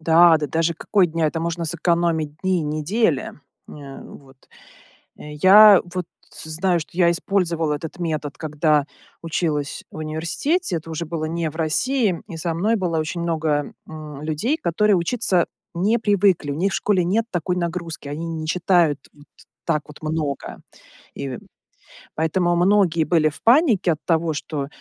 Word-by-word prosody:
Да, 165 +1 +6
да 150 - -2
даже 165 +2 0
какой 195 +2 +2
дня? 165 -1 -1
Это 160 +2 -2
можно 170 0 -2
сэкономить 165 -2 0
дни 185 -3 +1
недели, 155 - 0 0.4
э, 140 -2 -10
вот. 135 -2 -14 0.8
Э, 150 - -9
я 205 +1 +9
вот 180 -2 -3 0.4
знаю, 170 +3 0
что 155 - -9
я 170 -1 +5
использовала 170 -4 0
этот 160 +3 -7
метод, 155 -4 -3
когда 150 -1 +1 0.4
училась 155 -3 -2
в - - -12
университете. 170 - -1
Это 165 0 -7
уже 160 +1 -3
было 155 -1 -3
не 165 0 -2
в 160 - -13
России. 190 - 0
И 170 - -7
со 165 +1 -3
мной 210 +7 +1
было 175 -5 -1
очень 155 +2 -3
много, 155 -3 -1 0.2
м, 150 -2 -9
людей, 160 - -1
которые 210 - +2
учиться 180 0 +1 0.3
не 210 +7 +1
привыкли. 200 -7 +2
У - - -2
них 190 +5 0
в - - -3
школе 190 -4 +1
нет 215 +6 +1
такой 180 +1 -2
нагрузки. 170 -3 -4
Они 155 +4 -5
не 160 -1 -5
читают 170 -3 +2
т - - -22
т 145 0 -19 0.4
так 155 -3 +1
вот 150 0 -14
много. 155 -3 -3 0.6
И, - - -5
э, 125 - -6 0.8
поэтому 175 +2 +1
многие 175 -2 +3
были 155 -1 +2
в 150 - -13
панике 235 - +4
от 155 - -9
того, 165 -1 +1
что, 145 -1 -4
165 Hz, 165 wpm, -22 LUFS, 155-180 Hz, 0.8 s, я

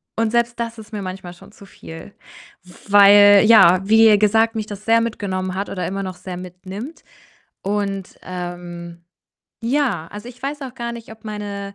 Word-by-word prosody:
und 225 -1 0
selbst 235 0 0
das 230 0 -4
ist 220 +1 -14
mir 210 - -4
manchmal 185 -2 -7
schon 195 +3 -17
zu 200 - -16
viel. 165 0 -12 0.8
Weil, 205 0 +7
ja, 190 -5 +6
wie 220 -1 +6
gesagt, 225 +2 +2
mich 215 - -3
das 205 0 -9
sehr 230 0 +4
mitgenommen 190 -5 -3
hat 200 +1 -4
oder 185 - -4
immer 195 +1 -4
noch 185 -1 -6
sehr 185 -1 -8
mitnimmt. 185 - -9 0.6
Und, 195 -1 -3
ähm, 175 -1 -8 0.6
ja, 240 - -1
also, 205 +4 -9
ich 250 +1 -15
weiß 285 +2 -4
auch 260 -1 -8
gar 235 0 -5
nicht, 230 -2 -10
ob 220 0 -17
meine 200 -2 -6
205 Hz, 175 wpm, -20 LUFS, 185-225 Hz, 0.8 s, Weil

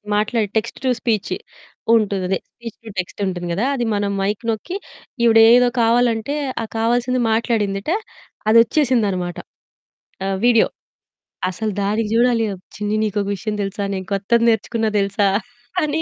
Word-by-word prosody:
మాట్లాడే 215 0 +1
text 220 +1 -3
to - - +3
speech 220 -5 -1 0.6
ఉంటుందదే. 195 -3 +1 0.2
Speech 235 -2 -9
to - - -8
text 180 - -5
ఉంటుంది 175 -1 -4
గదా! 210 +8 0
అది 240 -3 -1
మనం 205 0 0
మైక్ 205 +3 -1
నొక్కి 285 - -5 0.5
"ఈవిడ 225 -1 +6 0.2
ఏదో 250 0 +5
కావాలంటే 235 +3 +2 0.3
ఆ - - -3
కావాల్సింది 245 +2 +1
మాట్లాడిందట, 220 +1 0 0.6
అది 230 - +6
ఓచ్చేసింది 250 -5 +1
అనమాట." 175 -1 -3 0.9
ఆహ్, 195 0 -1
వీడియో. 230 -2 +5 0.8
అసలు 215 +3 -3
దానికి 210 +2 0
చూడాలి 235 -1 +3 0.3
"చిన్ని 210 0 -2
నీకొక 205 -1 -1
విషయం 210 +2 -4
తెలుసా? 200 +1 -3
నేను 190 0 -5
కొత్తది 230 +4 +2
నేర్చుకున్నా 225 0 0
తెలుసా?" 200 0 +1 0.6
అని 305 +2 0
220 Hz, 140 wpm, -20 LUFS, 200-235 Hz, 0.9 s, ఈవిడ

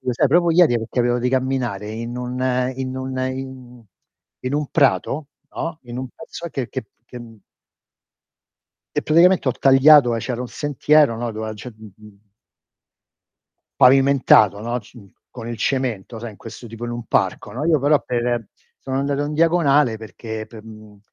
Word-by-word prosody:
lo 125 - -1
sai, 130 - +2
proprio 170 +3 +3
ieri, 165 -7 +4
perché 115 +3 -6
avevo 120 0 +2
di 125 +1 0
camminare 125 -6 -2
in 115 +2 -6
un 125 0 -5 0.4
in 130 0 -4
un 130 0 -5
in 130 -2 -9 0.6
in 130 +2 -3
un 150 0 -1
prato, 145 0 +1 0.3
no, 165 -1 -4
in 120 -1 -9
un 130 - -5
pezzo 170 - -8
che 130 -5 -4
che 130 -4 -5 0.2
che 125 - -10 1.8
e - - +1
praticamente 170 -1 +4
ho - - +2
tagliato 135 -1 +5
e 115 - -2
c'era 125 0 -4
un 125 - -4
sentiero, 145 -1 +2
no, 115 0 -4
dove 110 0 -5
a - - -4
ge 110 +3 -9
mhmm 105 -1 -16 1.6
Pavimentato, 130 -6 +5
no, 120 +3 -2
c 125 - -17
mh, 100 -3 -16 0.2
con 120 -2 -8
il 120 - -5
cemento, 120 -4 -2
sai 120 - -6
in 105 - -15
questo 115 +2 -11
tipo 115 +2 -8
in 120 - -4
un 120 -1 -6
parco, - - -1
no 130 +7 -4
Io 160 -3 +3
però 145 +2 +3
per 120 -2 -1 0.3
sono 135 0 -4
andato 140 +1 -1
in 145 - -4
diagonale 150 -7 +3
perché 110 +1 -8
p 110 - -12
mhmm, 110 -2 -14
125 Hz, 175 wpm, -21 LUFS, 115-140 Hz, 1.8 s, tagliato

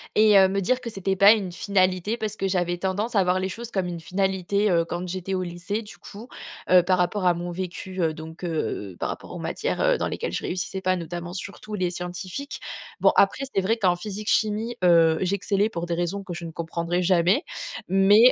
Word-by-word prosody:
et 215 -1 +6
heu, 190 -1 +6
me 195 - 0
dire 250 +7 +1
que 240 - -5
c'était 195 -2 -1
pas 200 +2 +8
une 200 -5 0
finalité 185 +2 +1
parce 215 -2 -3
que 195 -2 -1
j'avais 175 -1 0
tendance 200 +6 -2
à 195 - +5
voir 180 +1 +2
les 190 - -1
choses 235 +5 -7
comme 190 -4 -1
une 170 -1 -5
finalité, 190 +3 0
heu, 170 -2 +3
quand 175 +2 -4
j'étais 185 +1 -4
au 185 -1 0
lycée, 180 +5 -4
du 210 - -12
coup, 215 +4 -11 0.4
heu, 180 -1 +7
par 185 +1 +2
rapport 185 +2 0
à 180 - +5
mon 175 +1 -5
vécu, 185 +1 -5
heu, 160 -2 +1
donc, 160 +2 -10
heu, 110 - -3
par - - -1
rapport - - -7
aux - - -6
matières, - - -2
heu, - - +3
dans - - -1
lesquelles 85 - -4
je - - -3
réussissais 190 +1 -3
pas, 185 0 +1
notamment 175 0 -6
surtout 200 +3 -7
les 185 -3 0
scientifiques. 180 +10 -6 0.4
Bon, - - +5
après 200 +7 +3
c'est 195 - +3
vrai 225 +5 +1
qu'en 185 -5 +3
physique-chimie, 215 +4 -1
heu, 165 -2 +5
j'excellais 200 +2 +1
pour 170 -5 -4
des 170 - -2
raisons 175 +4 -2
que 185 - -6
je 170 0 -7
ne 165 - -6
comprendrai 170 +2 -2
jamais, 180 - +3 0.4
mais, 200 +6 +6
185 Hz, 220 wpm, -25 LUFS, 175-200 Hz, 0.4 s, pas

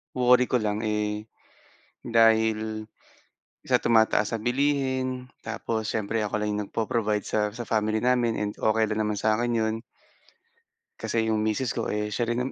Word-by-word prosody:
worry 125 0 +5
ko 125 -1 0
lang, 105 +1 -1
eh, 105 0 -1 0.8
dahil 110 -1 +2 0.7
sa - - +2
tumataas 110 -2 +3
na 115 - 0
bilihin 130 0 0 0.2
tapos 110 0 -3
siyempre 110 0 -1
ako 105 0 -2
lang 105 - -1
'yong - - -1
nagpo-provide 105 -1 -1
sa 110 - 0
sa 120 +1 -7
family 110 0 +1
namin 125 -1 +2
and 105 0 -1
okey 110 0 +2
lang 110 0 0
naman 105 -1 -1
sa 110 0 +2
akin 120 +1 0
'yon. 110 -1 +1 1.3
Kasi 115 -1 -1
'yong 110 -1 +1
misis 110 +3 0
ko, - - -2
eh, 105 0 -2
siya 120 -1 -1
rin 120 - 0
110 Hz, 160 wpm, -26 LUFS, 105-120 Hz, 1.3 s, worry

